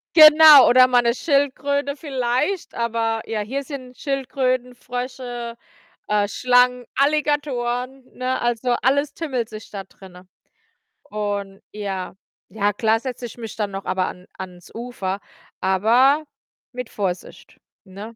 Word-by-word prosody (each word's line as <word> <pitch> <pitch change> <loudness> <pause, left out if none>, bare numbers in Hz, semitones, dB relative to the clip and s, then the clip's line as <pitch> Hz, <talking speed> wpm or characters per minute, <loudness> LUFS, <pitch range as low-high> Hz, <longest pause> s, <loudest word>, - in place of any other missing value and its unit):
Genau, 310 -2 +10
oder 255 +1 +7
mal 245 -1 +4
'ne 235 0 +1
Schildkröte 280 0 0
vielleicht, 270 +5 -2
aber 230 -1 -1
ja, 225 -1 -3
hier 265 +7 -4
sind 255 -3 -9
Schildkröten, 255 -2 -2
Frösche, 245 -1 -6 0.5
äh, 210 -1 +1
Schlangen, 250 +3 +2
Alligatoren, 270 -3 0
ne? 255 0 -2
Also, 240 +1 0
alles 285 +3 +1
tummelt 260 -8 -3
sich 215 -1 -10
da 200 -2 -6
drinnen, 185 -1 -16 0.8
und 205 -2 -4
ja. 195 -3 -5 0.3
Ja, 205 -1 0
klar 220 +2 +1
setze 250 -2 -5
ich 240 - -10
mich 225 -3 -8
dann 210 -2 -2
noch 195 0 -6
aber 185 -1 -1
an 180 0 -9
ans 180 -2 -10
Ufer, 225 -5 -4 0.4
aber 240 +10 +3 0.5
mit 250 -2 -6
Vorsicht, 190 -3 -5 0.2
ne? 210 +4 -10
245 Hz, 130 wpm, -22 LUFS, 210-265 Hz, 0.8 s, Genau